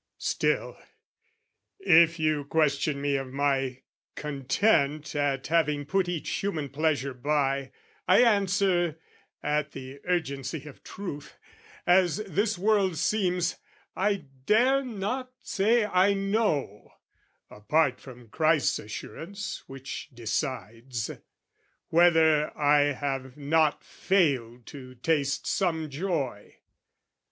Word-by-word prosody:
"Still, - - -1 1.0
if 170 - +5
you 155 -3 0
question 145 -1 +1
me 140 0 0
of 135 -1 -5
my 135 -2 -1 0.3
content 150 +1 0
"At 140 -2 0
having 150 -3 +1
put 185 +3 0
each 165 -3 -4
human 160 -4 -2
pleasure 140 -2 0
by, 140 0 -1 0.4
"I 185 +7 +6
answer, 195 -6 +2 0.5
at 150 0 -1
the 135 +1 -9
urgency 145 -5 -2
of 150 - -12
truth, 175 -8 -8 0.5
"As 180 -1 +4
this 205 +3 0
world 195 -3 +2
seems, 180 -1 0 0.4
I 200 -4 0 0.2
dare 260 +5 +4
not 250 +3 -4
say 220 +3 +2
I 195 0 +3
know 195 - -1 0.3
" - - -44
Apart 130 +5 +1
from 125 -3 -13
Christ's 155 +2 +2
assurance 180 - -7
which 135 +1 -7
decides 120 -1 -4 0.8
"Whether 160 -3 +4
I 145 0 +4
have 135 -1 -4
not 150 +1 +1
failed 130 -11 0
to 130 -2 -11
taste 140 +1 0
some 160 -5 -1
joy. 140 - -3
150 Hz, 105 wpm, -27 LUFS, 140-185 Hz, 1.0 s, I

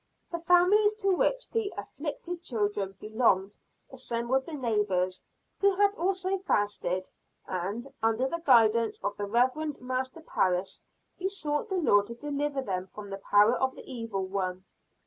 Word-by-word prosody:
The 340 - -2
families 365 +5 +4
to 395 -2 -1
which - - +1
the 445 -3 -1
"afflicted 300 +9 -5
children" 205 - -2
belonged 210 -3 +1 0.4
assembled 260 0 -1
the 330 - -7
neighbors 205 -8 0 0.4
who 400 -1 +4
had 405 +1 +4
also 375 +1 -1
fasted 205 - -1 0.4
and, 195 +6 -3 0.2
under 225 +3 +2
the 335 +5 -4
guidance 230 -5 +4
of 205 - -1
the 205 - -3
Reverend 260 +7 +1
Master 255 +4 -3
Parris, 185 - 0 0.4
besought 370 -1 -2
the 380 - -1
Lord 205 - +4
to 235 - -6
deliver 290 +1 -2
them 185 -4 -3
from 205 +1 -10
the 195 - -5
power 210 +4 +6
of 260 0 0
the - - -10
Evil 225 -6 -4
One. 185 -1 -3
245 Hz, 145 wpm, -29 LUFS, 205-335 Hz, 0.4 s, power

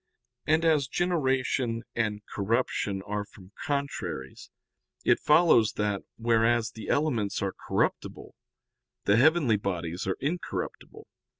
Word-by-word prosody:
And 160 +2 +3
as 150 -5 +3
generation 130 -8 0
and 105 -3 -1
corruption 100 -2 -1
are 105 0 -2
from 100 -2 -16 0.2
contraries, 140 - -4 0.6
it - - +4
follows 150 -8 +4
that, 105 -2 -1 0.2
whereas 115 0 +2
the 110 -2 -9
elements 125 -9 0
are 95 - -2
corruptible, - - -1 0.7
the 100 - +4
heavenly 140 -4 +4
bodies 90 -3 -3
are 95 - -1
incorruptible. 160 +5 -4
115 Hz, 110 wpm, -28 LUFS, 105-140 Hz, 0.7 s, it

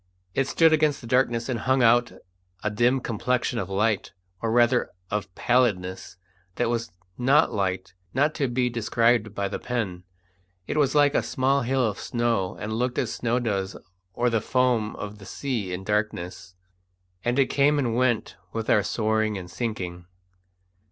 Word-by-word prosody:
It 135 -1 +1
stood 160 +1 +4
against 150 -2 +2
the - - -10
darkness 120 -1 +1
and 125 -3 -2
hung 130 +2 +2
out 120 +1 +4 0.5
a 105 - 0
dim 120 +5 +2
complexion 120 +1 -1
of 95 - -4
light, 105 +1 0 0.3
or 115 - -1
rather 120 +1 +3 0.2
of 105 -2 -2
pallidness, 95 -6 0 0.4
that 120 -1 0
was 115 -5 -2 0.3
not 135 +4 +4
light 95 -2 -2 0.2
not 145 +6 +2
to 140 - 0
be 125 0 0
described 115 -2 +1
by 100 0 -1
the 100 - -4
pen. 105 -8 -3 0.6
It - - -3
was 145 -1 +2
like 145 -1 +5
a - - +3
small 135 +1 +1
hill 130 +1 +1
of 105 -2 -4
snow, 115 -6 -1
and 105 +3 -4
looked 125 +2 -1
as 115 - -1
snow 120 0 0
does 100 -6 -2 0.4
or 120 0 +1
the 115 -2 +1
foam 125 -4 +1
of 105 0 -7
the 100 - -12
sea 120 -9 -3
in 90 +1 -4
darkness, 95 -3 -3 0.7
and 120 +2 0
it 135 - +3
came 145 +1 +3
and 120 -5 0
went 120 -2 0 0.2
with 115 -1 -1
our 105 - +5
soaring 110 0 0
and 90 -1 -8
sinking. 90 -7 -4
115 Hz, 170 wpm, -25 LUFS, 105-125 Hz, 0.7 s, like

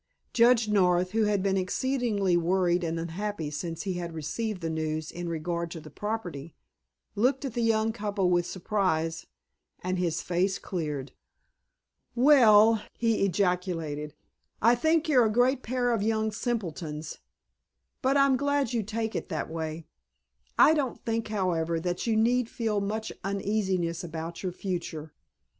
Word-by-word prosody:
Judge 235 -2 +5
North, 180 -3 +2
who 220 0 +2
had 205 -2 +1
been 195 -1 +1
exceedingly 205 -1 0
worried 175 +1 +2
and 165 0 -2
unhappy 170 -1 -4
since 165 +2 -4
he 195 -3 -2
had 170 -2 -5
received 195 +6 -3
the 165 - -2
news 155 0 -3
in 175 0 -5
regard 170 +1 -2
to 165 - -7
the 155 -1 -12
property, 175 -6 -5 0.6
looked 255 +6 +1
at 260 - -4
the 240 - -1
young 225 -1 +2
couple 205 -3 -1
with 175 0 +2
surprise, 165 -4 -1 0.6
and 185 0 -1
his 170 -2 0
face 185 +2 0
cleared. 150 -7 -4 1.0
"Well," 225 -5 +6 0.2
he 230 -3 +1
ejaculated, 175 -6 -1 0.4
"I 230 +3 +5
think 315 +6 +2
you're 255 -6 +5
a - - -1
great 245 +4 +3
pair 245 0 0
of 225 - 0
young 220 0 0
simpletons, 175 - -4 0.8
but 270 +2 +2
I'm 275 -1 +4
glad 285 -2 0
you 235 - +1
take 220 +1 -3
it - - -4
that 160 -2 -3
way. 160 0 -4 0.7
I 310 - +7
don't 280 -6 -1
think, 225 0 -1
however, 170 -5 0
that 175 +5 -3
you 225 - +2
need 240 +2 +2
feel 220 -3 -1
much 215 +2 -3
uneasiness 190 -4 -1
about 165 0 -6
your 185 - -2
future. 170 -4 -5
195 Hz, 150 wpm, -28 LUFS, 170-225 Hz, 1.0 s, I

